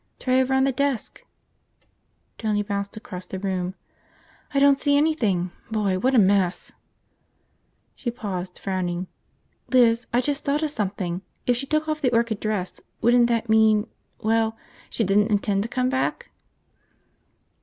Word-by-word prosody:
"Try 255 0 +2
over 265 +1 +1
on 265 - +3
the 275 - +3
desk." 275 -2 -2 1.2
Tony 210 -2 0
bounced 200 +1 -4
across 185 -4 -8
the 190 - -5
room. 185 -1 -2 0.8
"I 280 - -2
don't 280 0 +5
see 285 -1 +3
anything. 220 - +1 0.2
Boy, 205 -4 0
what 260 +6 +2
a - - +5
mess!" 195 -3 +2 1.2
She 245 - -3
paused, 190 -6 -5
frowning. 185 -2 -2 0.6
"Liz, 240 -2 +4
I 240 - +3
just 285 +3 -1
thought 290 +2 0
of 305 - 0
something! 190 - -3 0.2
If 245 - +3
she 275 +3 -4
took 310 +1 0
off 310 0 -2
the 255 -4 +2
orchid 230 -2 +1
dress, 210 -4 -3 0.2
wouldn't 240 0 +5
that 235 -1 0
mean... 220 -1 +4 0.3
well, 225 0 +1 0.3
she 230 - 0
didn't 205 +2 +3
intend 200 -1 +1
to 225 - -3
come 255 +1 0
back?" 260 0 -2
220 Hz, 150 wpm, -24 LUFS, 200-255 Hz, 1.2 s, don't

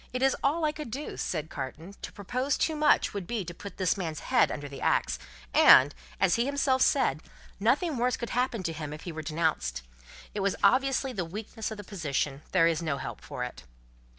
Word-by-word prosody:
"It 255 +1 -1
is 270 - +4
all 310 +4 +2
I 305 - +2
could 305 -4 -7
do," 280 +7 -5
said 155 -2 -3
Carton. 160 +8 -6
"To - - -6
propose 250 +7 -1
too 320 - +1
much, 300 0 +3
would 200 -4 -4
be 225 -6 -2
to 175 - -6
put 200 +3 -10
this 185 -3 +2
man's 165 -6 -4
head - - +3
under 145 0 -5
the 140 - -9
axe, - - +1 0.3
and, 135 +2 +8 0.3
as 190 +1 +3
he 235 - +2
himself 280 -2 +1
said, 155 - +3 0.4
nothing 275 - +2
worse 245 +1 +1
could 235 - -5
happen 245 -4 0
to 165 - -2
him 150 -1 -5
if 155 - -8
he 175 - -5
were 160 0 -5
denounced. 155 - -1 0.5
It 210 - -3
was 195 -1 +1
obviously 265 +4 +3
the 190 -6 -2
weakness 210 +5 -5
of 220 - -6
the 205 - -7
position. 145 -7 -2
There 180 -3 +5
is 165 -1 +2
no 155 -4 -1
help - - -6
for 125 - -5
it." 125 - -7
195 Hz, 215 wpm, -29 LUFS, 155-255 Hz, 0.5 s, and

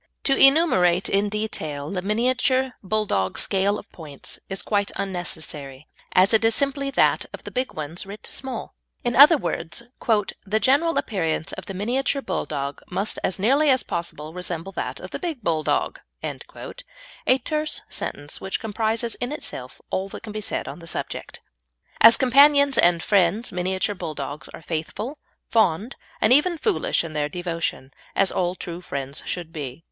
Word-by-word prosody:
To 270 - +3
enumerate 270 - +5
in 200 +1 +2
detail 160 -9 -2
the 185 -2 -2
Miniature 255 +5 +1
Bulldog 190 - 0
scale 200 +1 +2
of - - -10
points 150 -5 -7
is 195 0 -2
quite 200 -1 0
unnecessary, 160 -7 -4 0.3
as 185 +4 +5
it 220 - +5
is 225 0 +5
simply 275 0 +1
that 275 - +2
of - - -8
the - - -8
big 255 +1 -2
ones 155 +5 -5
writ 205 +1 -9
small. 260 -4 -5 0.3
In 240 -1 0
other 295 +5 +9
words, 170 - -3 0.6
"the 210 +2 0
general 290 +7 +3
appearance 165 -7 -1
of - - -7
the 195 - -6
Miniature 250 +8 0
Bulldog 140 -1 -3
must 200 +2 -2
as 185 - +1
nearly 275 +10 +3
as 260 -4 +4
possible 160 -3 -4
resemble 180 0 -4
that - - -4
of - - -9
the - - -4
Big 320 - -4
Bulldog" 160 -4 0 0.2
a - - -4
terse 305 +3 -2
sentence 145 0 -4
which 190 0 -2
comprises 225 +1 0
in 245 - -1
itself 130 - -6
all 190 +1 -1
that - - -9
can 215 - -7
be 215 - -3
said - - -3
on - - -7
the 165 - -12
subject. - - -5 0.6
As 230 +1 +9
companions 280 +2 +6
and 170 -1 +4
friends 205 +3 +2
Miniature 185 +3 -1
Bulldogs 150 -5 -6
are - - -11
faithful, 190 - -4 0.3
fond, 215 +1 +2 0.2
and 215 - +5
even 335 +5 +4
foolish 400 - +1
in 165 -2 -7
their 150 -1 -1
devotion, 165 -5 -3 0.2
as 195 -1 +3
all 180 0 0
true 175 -1 -6
friends 140 -3 -5
should 170 -2 -4
be. 140 -3 -6
200 Hz, 160 wpm, -24 LUFS, 165-255 Hz, 0.6 s, other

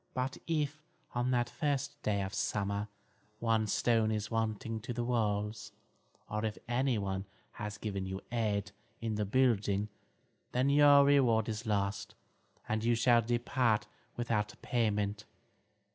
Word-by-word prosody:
But 130 +1 -2
if, 155 -2 -1 0.3
on 120 +1 0
the 125 -1 +3
first 140 +2 -2
day 100 -2 0
of 95 +1 -5
summer, 100 0 -1 0.5
one 110 -1 +2
stone 110 +1 +2
is 110 0 -2
wanting 110 0 -1
to 120 - -5
the 120 0 -2
walls, 105 -3 -1 0.5
or 105 +1 -3
if 110 -1 -2
anyone 110 -7 0 0.3
has 105 0 -6
given 100 -3 -3
you 95 0 -4
aid 105 -4 0 0.3
in 115 -1 -2
the 105 0 -1
building, 105 -3 +2 0.6
then 130 +3 +2
your 145 -1 +7
reward 125 -6 +4
is 110 +1 -4
lost, 100 -1 -1 0.5
and 110 0 -1
you 120 0 +3
shall 120 0 +5
depart 120 -2 +1 0.3
without 110 -3 -1
payment." 105 -3 0
110 Hz, 135 wpm, -33 LUFS, 105-120 Hz, 0.6 s, your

